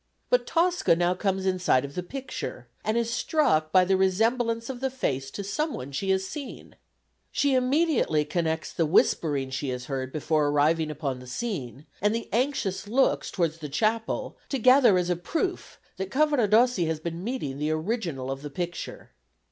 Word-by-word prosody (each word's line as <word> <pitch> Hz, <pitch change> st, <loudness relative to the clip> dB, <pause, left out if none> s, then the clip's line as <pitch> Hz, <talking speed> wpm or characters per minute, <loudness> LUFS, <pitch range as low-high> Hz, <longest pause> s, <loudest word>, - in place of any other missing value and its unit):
But -, -, +3 dB
Tosca 345 Hz, -, +3 dB
now 175 Hz, +1 st, +2 dB
comes 190 Hz, 0 st, -1 dB
in 185 Hz, -1 st, +1 dB
sight 140 Hz, -7 st, +3 dB
of 140 Hz, -, -9 dB
the 180 Hz, -, -3 dB
picture, 250 Hz, -, -6 dB, 0.2 s
and 215 Hz, +2 st, 0 dB
is 235 Hz, 0 st, 0 dB
struck 160 Hz, -, +1 dB
by 185 Hz, +1 st, +5 dB
the 190 Hz, +1 st, +3 dB
resemblance 230 Hz, +5 st, +1 dB
of 260 Hz, -2 st, -5 dB
the 265 Hz, +1 st, 0 dB
face 135 Hz, -, -2 dB
to 200 Hz, -, -6 dB
some 300 Hz, +11 st, -2 dB
one 135 Hz, +2 st, -7 dB
she 190 Hz, +8 st, -3 dB
has 190 Hz, 0 st, +2 dB
seen. 280 Hz, +6 st, -8 dB, 0.6 s
She 280 Hz, -1 st, +2 dB
immediately 255 Hz, -, +2 dB
connects 160 Hz, 0 st, -2 dB
the 165 Hz, -, +1 dB
whispering 145 Hz, -3 st, +2 dB
she 135 Hz, +1 st, -3 dB
has 125 Hz, 0 st, -4 dB
heard 130 Hz, -1 st, -3 dB
before 155 Hz, 0 st, +1 dB
arriving 155 Hz, +2 st, +2 dB
upon 140 Hz, -4 st, -3 dB
the 125 Hz, -, -12 dB
scene 145 Hz, -, -4 dB, 0.2 s
and 210 Hz, +2 st, +2 dB
the 230 Hz, -, -4 dB
anxious 230 Hz, -6 st, 0 dB
looks 260 Hz, +5 st, +2 dB
towards 165 Hz, -3 st, -1 dB
the 150 Hz, -2 st, -6 dB
chapel 220 Hz, +9 st, -1 dB
together 255 Hz, -5 st, +5 dB
as 180 Hz, 0 st, 0 dB
a -, -, +2 dB
proof 335 Hz, -, -3 dB, 0.2 s
that 190 Hz, 0 st, -4 dB
Cavaradossi 245 Hz, -, +3 dB
has 160 Hz, -1 st, -1 dB
been 170 Hz, +2 st, -5 dB
meeting 205 Hz, -, -3 dB
the 150 Hz, +1 st, 0 dB
original 155 Hz, -, -2 dB
of 135 Hz, 0 st, -5 dB
the 145 Hz, -, -6 dB
picture. 175 Hz, +4 st, -6 dB
185 Hz, 180 wpm, -27 LUFS, 155-240 Hz, 0.6 s, by